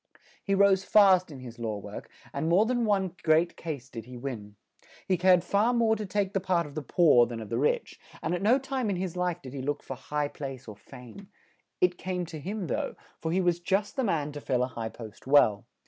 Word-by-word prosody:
He 195 - +1
rose 195 -1 +4
fast 190 -4 +5
in 140 -4 -10
his 120 -1 -10
law 110 -3 -3
work; 100 - -9 0.2
and 160 - -1
more 185 +6 +5
than 240 0 0
one 190 -4 0
great 160 +2 +3
case 145 -6 -6
did 115 -4 -8
he 125 0 -10
win; 115 -6 -6 0.5
he 185 - +3
cared 180 0 +4
far 210 +6 +2
more 225 -2 +3
to 210 -1 -5
take 200 0 -1
the 195 - +1
part 180 -2 0
of 145 - -10
the 155 - -4
poor 145 -6 +4
than 115 -1 -6
of 110 -2 -8
the 115 - -1
rich; 145 - 0 0.2
and 160 - -1
at 180 - -2
no 225 +6 +4
time 265 -4 -2
in 195 - 0
his 180 -1 -3
life 180 -2 -2
did 130 -1 -9
he 135 - -5
look 145 +2 -3
for 135 - -6
high 150 +3 -2
place 135 -3 -8
or 105 - -8
fame; 125 - -13 0.5
it 180 -1 +2
came 180 -1 -3
to 160 -2 -8
him 195 +5 -4
though, - - -2 0.2
for 160 - -3
he 185 +3 +2
was 175 -1 +1
just 195 +4 -1
the 265 - 0
man 155 -8 0
to 145 0 -8
fill 125 -2 0
a 125 - -2
high 115 -2 -5
post 110 +1 -11
well. 130 -8 +4
170 Hz, 240 wpm, -28 LUFS, 130-190 Hz, 0.5 s, fast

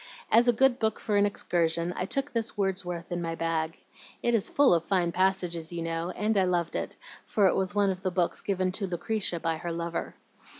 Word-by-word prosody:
As 235 +2 +5
a - - +7
good 260 +2 +3
book 220 -1 0
for 210 - -1
an 205 0 +4
excursion, 170 -3 0
I 180 - -2
took 275 +7 0
this 230 -3 -2
Wordsworth 180 -4 -2
in 175 0 -2
my 165 -1 -3
bag. 165 -1 -2 0.5
It 240 - +2
is 225 -4 +2
full 285 -8 +4
of 165 -1 +2
fine 180 -2 +1
passages, 180 -3 0
you 170 -1 -4
know, 165 +1 -2
and 210 +3 -1
I 190 - +5
loved 175 -2 0
it, - - -3 0.3
for 205 - +1
it 185 - +5
was 190 +2 -1
one 200 -1 +3
of 185 0 -6
the 190 - 0
books 175 -1 0
given 185 -2 0
to 195 +1 -3
Lucretia 180 0 -1
by 165 -1 -1
her 170 +1 -4
lover. 170 0 -4
185 Hz, 220 wpm, -28 LUFS, 170-205 Hz, 0.5 s, a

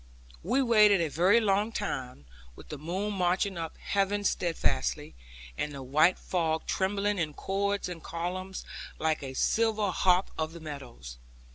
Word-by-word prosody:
We 250 +10 +1
waited 210 -5 +6
a 165 -2 0
very 185 +9 +4
long 210 0 +1
time, 130 - -4 0.3
with - - -14
the 150 - -6
moon 190 +7 -3
marching 185 +1 +1
up 165 -1 -5
heaven 200 +1 0
steadfastly, 160 - 0 0.4
and 150 - -3
the 135 -1 -7
white 155 +7 +4
fog 160 -3 -1
trembling 200 +1 0
in 155 -3 -2
chords 200 +1 -1
and 175 -2 -7
columns, 185 +4 -5 0.3
like 155 0 0
a 135 -1 -6
silver 215 - +1
harp 180 +1 +2
of 160 0 -2
the 170 - -9
meadows. 125 - -9
180 Hz, 150 wpm, -29 LUFS, 155-200 Hz, 0.4 s, waited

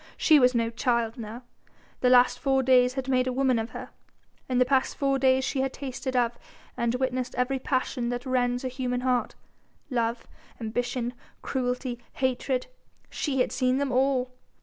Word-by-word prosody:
She 310 -3 +5
was 250 -1 +4
no 230 -1 +1
child 235 -1 0
now! 230 +3 -7 0.6
The 250 - +3
last 245 0 +5
four 270 -1 +2
days 250 0 +4
had 265 -1 -3
made 255 -1 +2
a - - 0
woman 255 -2 +2
of 225 +1 -3
her: - - -8 0.6
in 255 - +1
the 250 - +5
past 265 0 +1
four 275 -1 +1
days 265 0 +3
she 270 - -1
had 270 0 -1
tasted 260 -1 -5
of 240 -1 +1 0.4
and 235 0 0
witnessed 255 -1 -2
every 250 +2 0
passion 255 -2 -1
that 245 +2 -4
rends 245 -1 0
a - - +1
human 250 -1 -2
heart, 250 -1 0 0.6
love, 235 -1 -1 0.3
ambition, 245 +2 -2 0.3
cruelty, 250 -1 -2
hatred! 260 0 -1 0.5
She 270 -4 -1
had - - 0
seen 255 0 +1
them 280 -1 -1
all! 255 0 +1
255 Hz, 170 wpm, -27 LUFS, 245-265 Hz, 0.6 s, She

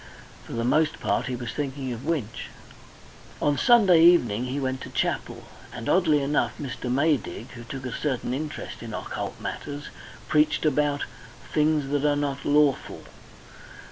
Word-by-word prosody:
For - - -9
the 115 - -1
most 150 +5 +2
part 125 - 0
he 130 - -2
was 120 -2 -5
thinking 135 -3 -3
of 120 +2 -8
Winch. 145 -9 -2 0.9
On 145 -1 +2
Sunday 190 - +6
evening 125 -10 +5
he 130 +3 -3
went 130 -1 -2
to - - -7
chapel, - - -2 0.3
and 115 -2 -7
oddly 155 -6 +3
enough, 145 +2 0
Mr. 130 -3 -4
Maydig, 135 -4 0
who 120 -1 -9
took 130 +2 -7
a 125 - -3
certain 130 -4 -2
interest 150 +3 -5
in - - -6
occult - - -5
matters, 145 0 -6 0.4
preached 150 +1 +2
about 145 -1 +1 0.5
"things 150 -2 +2
that 145 0 0
are 145 -1 +3
not 140 -1 -2
lawful." 145 -1 +2
145 Hz, 155 wpm, -26 LUFS, 130-150 Hz, 0.9 s, Sunday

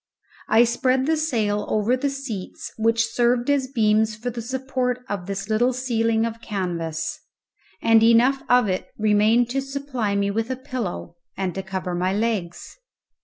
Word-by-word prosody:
I 225 +2 +6
spread 255 +2 +1
the 320 +2 +2
sail 220 -10 0
over 215 +4 +2
the 280 +2 -1
seats, 275 - -6
which 225 0 +2
served 240 +3 +1
as 275 -2 +1
beams 220 -3 +2
for 240 +3 -4
the 235 0 -5
support 255 0 -2
of 195 -5 -4
this 195 0 -4
little 235 +4 +2
ceiling 230 -3 +1
of 230 0 -5
canvas, 170 -7 -3 0.6
and 225 -1 +5
enough 235 +4 +4
of 245 -3 +5
it 185 -1 -2
remained 215 +3 +3
to 270 +1 0
supply 270 -6 -3
me 200 0 +1
with 225 +3 -2
a 260 - -1
pillow 245 -10 -5 0.2
and 190 -2 -2
to 195 - -3
cover 190 -1 -4
my 180 +2 0
legs. 210 - -3
230 Hz, 165 wpm, -23 LUFS, 205-255 Hz, 0.6 s, I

